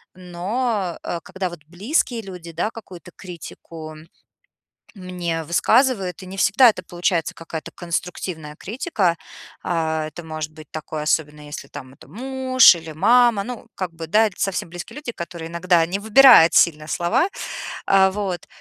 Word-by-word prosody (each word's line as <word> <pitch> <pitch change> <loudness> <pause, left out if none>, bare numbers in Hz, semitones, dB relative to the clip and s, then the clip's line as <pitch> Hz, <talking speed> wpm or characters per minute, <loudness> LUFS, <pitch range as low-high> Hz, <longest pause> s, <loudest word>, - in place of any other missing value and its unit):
но, 185 +2 -3
а, 170 - -3
когда 190 -1 -4
вот 170 -2 -10
близкие 230 - -1
люди, 180 -4 -10
да, 215 - -1
какую-то 180 -5 -12
критику 165 -3 -10 1.0
мне 175 -3 -4
высказывают, 195 - +2
и - - -9
не 190 +1 -8
всегда 235 +6 +6
это 185 - -3
получается 175 -1 -1
какая-то 160 -1 -7
конструктивная 170 -3 -5
критика, 205 - -1 0.5
а, 160 -2 -1
это 170 +2 -10
может 155 -1 -5
быть 155 -1 -13
такое, 155 -1 -5
особенно 150 -1 0
если 150 +1 -8
там 130 0 -10
это - - -18
муж 260 0 +4
или 165 -1 -8
мама, 230 +4 +4
ну, 240 0 -8
как 180 -3 -4
бы, 165 -1 -7
да, 220 +6 +4
это 195 - -9
совсем 190 -3 -1
близкие 175 +8 -9
люди, 290 -5 -5
которые 170 -3 -7
иногда 170 -1 +2
не 190 +4 -3
выбирают 220 -5 +7
сильно 155 -2 +3
слова, 175 - +1 0.6
а, 190 -1 +4
вот, 195 -3 -4
180 Hz, 150 wpm, -22 LUFS, 165-210 Hz, 1.0 s, выбирают